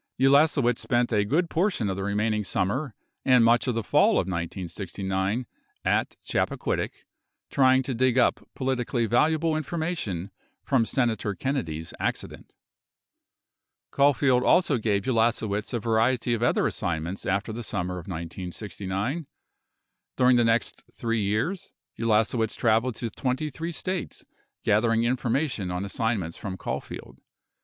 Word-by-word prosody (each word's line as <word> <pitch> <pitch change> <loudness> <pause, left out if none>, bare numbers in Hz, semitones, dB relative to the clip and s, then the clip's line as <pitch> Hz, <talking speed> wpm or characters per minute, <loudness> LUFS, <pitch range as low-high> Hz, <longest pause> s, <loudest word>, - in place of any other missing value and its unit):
Ulasewicz 135 -2 +4
spent 120 -1 0
a 105 -1 +3
good 155 - +1
portion 170 - 0
of 95 - -1
the 95 - -4
remaining 105 +1 0
summer 105 +7 -1 0.3
and 125 -3 +5
much 120 +3 +4
of 125 - 0
the 115 - -1
fall - - +4
of - - +2
1969 95 +4 -3 0.4
at - - +1
Chappaquiddick - - -1 0.6
trying 130 -1 +4
to 130 - -3
dig 130 +1 +2
up 125 - +3 0.2
politically 125 -2 0
valuable 155 +7 +2
information 155 - -3 0.3
from 125 -4 +2
Senator 110 -5 0
Kennedy's 85 - -3
accident. - - -4 1.4
Caulfield 140 -2 +3
also 155 -8 +3
gave 105 -3 0
Ulasewicz 110 -4 0
a 120 - -1
variety 115 +2 +1
of 115 - -1
other 120 - +2
assignments 85 +3 -3
after 100 +3 -1
the 120 - -5
summer 90 -4 -3
of 85 - -12
1969. 95 - -4 0.9
During 125 0 +5
the 120 - +4
next 115 -1 +1
3 115 -1 -1
years, 110 - -1 0.3
Ulasewicz 110 0 +1
traveled 115 +1 +2
to 115 0 -4
23 150 +8 -3
States 185 +1 -4 0.4
gathering 115 +2 +3
information 120 - 0
on 90 +2 -3
assignments 100 -5 -2
from 95 -4 -5
Caulfield. - - -6
115 Hz, 130 wpm, -26 LUFS, 100-130 Hz, 1.4 s, and